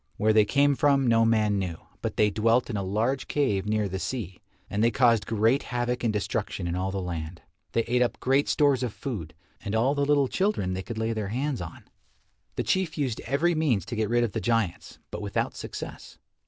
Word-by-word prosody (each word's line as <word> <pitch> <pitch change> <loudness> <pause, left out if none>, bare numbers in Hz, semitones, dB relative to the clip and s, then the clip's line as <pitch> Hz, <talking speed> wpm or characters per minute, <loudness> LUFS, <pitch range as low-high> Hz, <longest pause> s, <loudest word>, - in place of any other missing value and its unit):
Where 110 +1 +3
they 105 -1 +5
came 140 +5 +3
from, 140 -1 +3
no 115 -1 +4
man 105 -3 +2
knew, 90 -4 -3 0.2
but - - -3
they 105 -1 +4
dwelt 115 +4 +2
in - - -3
a 100 - -1
large 110 +8 -1
cave 105 -9 0
near 105 -1 +1
the 95 0 -4
sea, 95 -6 -4 0.3
and 100 +3 -1
they 115 - +5
caused 115 -3 +3
great 115 +5 +2
havoc 125 0 -2
and 115 - +2
destruction 105 -3 -2
in 85 0 -2
all 95 +1 -1
the 95 0 -3
land. 85 -1 -5 0.3
They 115 - +2
ate 125 +2 +1
up 125 - 0
great 135 +2 +2
stores 140 -3 +3
of 120 -4 -2
food, 100 - -5 0.3
and 105 0 -2
all 125 +5 +3
the 145 -1 0
little 140 -1 +3
children 185 - 0
they 95 - -3
could 110 +4 -7
lay 110 +1 0
their 110 -2 -3
hands 130 +4 -2
on. 85 -1 -8 0.7
The - - -1
Chief 185 -4 0
used 130 -7 -1
every 150 +7 +2
means 140 - +1
to - - -5
get 110 -1 0
rid 120 0 +3
of 115 - -1
the - - -3
giants, 115 -7 -1
but - - -5
without - - -2
success. - - -8
115 Hz, 220 wpm, -27 LUFS, 100-130 Hz, 0.7 s, they